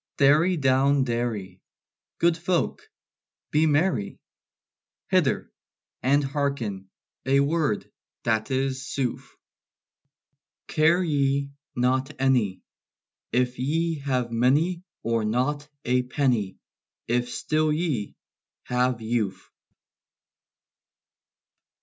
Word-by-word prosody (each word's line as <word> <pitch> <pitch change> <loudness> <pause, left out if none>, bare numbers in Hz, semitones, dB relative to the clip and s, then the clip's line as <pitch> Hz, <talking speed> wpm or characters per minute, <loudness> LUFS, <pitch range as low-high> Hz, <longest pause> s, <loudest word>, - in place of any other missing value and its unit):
"Derry 155 +5 +4
down 135 0 +3
derry! 115 -7 -3 0.6
Good 170 -1 +3
folk, 175 0 -1 0.6
be 155 +1 +3
merry! 145 - +1 0.9
Hither, - - +2 0.5
and 140 +3 +3
hearken 135 -9 -2 0.3
a 135 +1 +3
word 145 -6 0 0.4
that 110 -1 0
is 130 0 -1
sooth: 130 -4 -2 1.4
Care 165 +4 +3
ye 140 -3 +1 0.2
not 130 +2 0
any, 125 -8 +1 0.7
If 125 0 0
ye 160 +4 0
have 130 -4 -1
many 145 +10 +2 0.2
Or 115 -1 0
not 135 +7 -1 0.2
a 125 +1 +3
penny, 125 -6 0 0.5
If 120 +1 0
still 155 +4 0
ye 150 - -1 0.5
have 125 -1 0
youth!" 110 -4 -2
135 Hz, 90 wpm, -25 LUFS, 120-150 Hz, 1.4 s, Derry